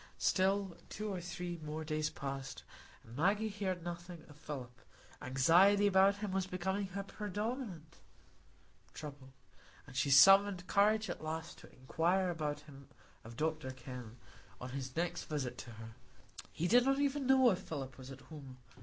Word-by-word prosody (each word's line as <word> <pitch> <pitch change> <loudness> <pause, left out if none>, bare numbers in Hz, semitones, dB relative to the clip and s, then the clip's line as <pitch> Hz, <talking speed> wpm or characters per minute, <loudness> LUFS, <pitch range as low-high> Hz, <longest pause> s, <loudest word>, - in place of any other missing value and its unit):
Still 190 -1 +1
two 210 -1 -4
or 180 - -4
three 175 0 -5
more 155 +1 -4
days 155 -1 -1
passed, 135 -2 -6 0.4
and 115 - -13
Maggie 205 +8 +2
heard 190 -4 -3
nothing 175 -1 -7
of 150 - -14
Philip; 125 -5 -8 0.4
anxiety 175 +11 +5
about 195 0 +5
him 205 -1 -4
was 190 0 -1
becoming 190 +2 -2
her 200 +1 -5
predominant 205 - -5 1.0
trouble, 140 -3 -9 0.5
and 135 -3 -13
she 140 +2 +1
summoned 195 +6 +7
courage 215 +3 +3
at - - -5
last 160 +1 -5
to - - -15
inquire 175 +8 0
about 150 -3 -3
him 140 -2 -14 0.4
of 115 +1 -11
Dr 155 -2 -1
Kenn, 125 -2 -9 0.4
on 125 0 -7
his 130 -1 -5
next 170 +1 -2
visit 145 -5 -3
to - - -8
her. 110 0 -10 0.6
He 170 - -1
did 245 +5 +6
not 270 +1 +2
even 280 -1 0
know 260 -2 +6
if 185 - -1
Philip 135 -4 -6
was 130 0 -9
at 135 -1 -10
home. 140 -5 -11
165 Hz, 160 wpm, -35 LUFS, 135-195 Hz, 1.0 s, summoned